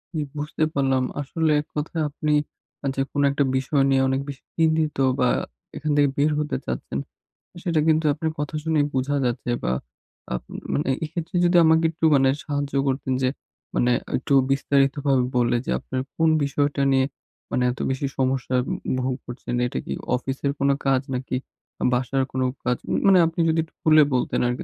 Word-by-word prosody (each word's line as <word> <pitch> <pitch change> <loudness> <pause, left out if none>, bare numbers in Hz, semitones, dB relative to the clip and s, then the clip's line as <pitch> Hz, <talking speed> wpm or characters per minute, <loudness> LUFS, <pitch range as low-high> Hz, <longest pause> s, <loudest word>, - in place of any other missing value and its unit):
জি, - - 0 0.2
বুঝতে 150 +2 -2
পারলাম। 135 -2 +2 0.2
আসলে 160 +3 0
১ 150 - -16
কথায় 155 +2 -2
আপনি 150 +1 -2 0.5
আ - - -5
যে 135 - 0
কোনো 145 - +1
১ 140 - -3
টা - - +6
বিষয় 135 +2 +1
নিয়ে 135 -1 +3
অনেক 135 +1 0
বেশি 140 -1 -8
চিন্তিত 160 -2 +2 0.2
বা 125 - +4 0.5
এখান 150 +1 -2
থেকে 145 -1 +4
বের 145 +2 +3
হতে 150 0 -1
চাচ্ছেন। 65 +1 -3 0.6
সেটা 170 -4 +1
কিন্তু 160 0 +3
আপনার 160 +2 -2
কথা 150 +1 -3
শুনেই 155 -2 +2
বুঝা 135 +2 0
যাচ্ছে 120 0 -2
বা - - +1 0.6
আ - - 0 0.4
মানে 145 - 0
এক্ষেত্রে 165 +2 -5
যদি 175 0 +4
আমাকে 160 +1 +4
একটু 165 0 -2
মানে 135 -1 +4 0.2
সাহায্য 145 -2 -2
করতেন 130 0 -1
যে 130 - +3 0.5
মানে 125 - +3 0.3
একটু 130 - -2 0.2
বিস্তারিতভাবে 140 -1 +2
বললে 120 -1 +2
যে - - -2
আপনার 130 - -4 0.2
কোন 160 0 +4
বিষয়টা 145 0 0
নিয়ে 130 0 +3 0.5
মানে 125 - +1
এত 125 - -9
বেশি 135 +1 -1
সমস্যা 130 -1 0 0.5
ভোগ 130 0 -1
করছেন। 120 0 -6
এটা - - -3
কি - - -3 0.2
অফিসের 135 +2 -2
কোন 140 - +2 0.2
কাজ 135 -1 +3
নাকি 130 0 -3 0.6
বাসার 130 +2 +1
কোন 130 - -2 0.2
কাজ? 125 0 +1 0.3
মানে 195 -1 +7
আপনি 165 +1 -6
যদি 160 +1 +2
একটু 160 - -17
খুলে 155 -1 +7
বলতেন 125 - 0
আরকি 125 +1 -2
140 Hz, 175 wpm, -24 LUFS, 130-155 Hz, 0.6 s, মানে